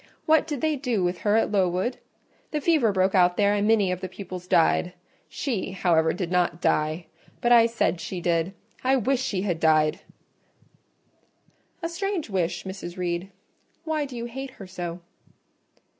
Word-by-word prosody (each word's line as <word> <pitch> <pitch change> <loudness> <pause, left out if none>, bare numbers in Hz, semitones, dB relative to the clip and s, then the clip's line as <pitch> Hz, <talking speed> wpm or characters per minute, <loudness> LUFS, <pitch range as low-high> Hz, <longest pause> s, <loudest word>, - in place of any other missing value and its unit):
What 315 0 +4
did 295 -5 -3
they 315 -1 +1
do 245 -8 -1
with 175 0 -1
her 210 0 +2
at 225 - +2
Lowood? 190 +4 +1 0.5
The 300 - -1
fever 295 -8 +3
broke 190 0 +2
out 180 -2 +4
there, 205 0 +3
and 205 0 +1
many 210 -4 +3
of 180 0 -3
the 185 - -4
pupils 185 -1 -8
died. 175 +1 +3 0.4
She, 230 -10 -3
however, 165 -4 +2
did 180 0 -4
not 175 -2 +1
die: 155 +1 0 0.3
but 240 - +1
I 230 -1 +7
said 225 -6 0
she 185 - -5
did—I 185 +9 -1
wish 265 +1 +1
she 195 -7 -1
had 175 -5 -1
died!" 155 +1 +3 1.8
"A - - +1
strange 355 - -3
wish, 180 -3 -1
Mrs. 190 -2 -7
Reed; 175 +1 -2 0.5
why 315 -2 -1
do 260 -3 -8
you 235 - -4
hate 265 +3 -6
her 195 - -9
so?" 175 -2 -6
195 Hz, 165 wpm, -25 LUFS, 175-240 Hz, 1.8 s, I